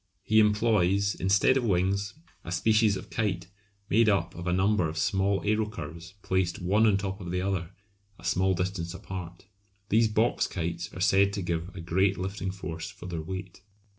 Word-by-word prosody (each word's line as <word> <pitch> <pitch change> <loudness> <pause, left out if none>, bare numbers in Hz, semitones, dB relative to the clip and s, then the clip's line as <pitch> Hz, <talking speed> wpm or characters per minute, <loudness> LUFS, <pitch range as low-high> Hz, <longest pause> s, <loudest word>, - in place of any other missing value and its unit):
He 110 0 +4
employs, 105 -2 +3
instead 100 +8 +3
of 130 - 0
wings, 100 0 0 0.3
a - - -7
species 110 +2 +3
of - - -10
kite 95 -6 -1 0.4
made 110 +2 +4
up 90 -5 +1
of 85 +1 -7
a - - +2
number 95 -1 +2
of 80 - -7
small 95 +1 +1
aerocurves 105 -4 -3
placed 95 -2 0
one 105 +5 +3
on 105 - +4
the - - +3
top 100 0 -4
of 90 -2 -5
another 90 -2 -1 0.5
a 85 - -17
small 95 +2 +2
distance 90 -1 -3
apart. 90 -2 -8 0.4
These 115 +1 +4
box 110 +2 +1
kites 85 -1 -4
are - - -7
said 100 +1 +4
to 100 - -3
give 85 0 -2
a 95 - -6
great 95 +4 +1
lifting 95 +1 -3
force 90 -2 -6
for 100 -2 -12
their 85 -3 -4
weight. 95 +2 -7
95 Hz, 180 wpm, -28 LUFS, 90-100 Hz, 0.5 s, He